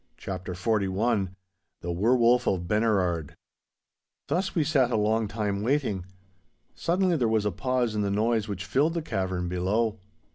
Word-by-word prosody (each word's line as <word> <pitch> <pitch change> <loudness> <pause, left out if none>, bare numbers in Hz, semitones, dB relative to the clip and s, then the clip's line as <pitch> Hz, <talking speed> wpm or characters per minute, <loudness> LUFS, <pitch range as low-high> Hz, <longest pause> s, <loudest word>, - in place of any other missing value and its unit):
*CHAPTER 95 -1 -5
XLI* 100 +1 +1 0.5
*THE 85 - -3
WERE 105 +9 +3
WOLF 120 +1 +4
OF 90 -2 0
BENERARD* 95 -8 +1 0.9
Thus 180 +6 -1
we 165 - +3
sat 140 -4 +2
a 120 - +1
long 110 +1 +1
time, 100 -1 -2
waiting. 110 -7 0 0.7
Suddenly 180 +1 +1
there 120 -5 +2
was 110 -1 +1
a 105 - +1
pause 125 +4 0
in 105 - -1
the 100 - 0
noise 110 +2 +1
which 100 -2 -4
filled 140 - +1
the 165 - -1
cavern 95 - -2
below. 105 +5 0
110 Hz, 155 wpm, -27 LUFS, 95-120 Hz, 0.9 s, WOLF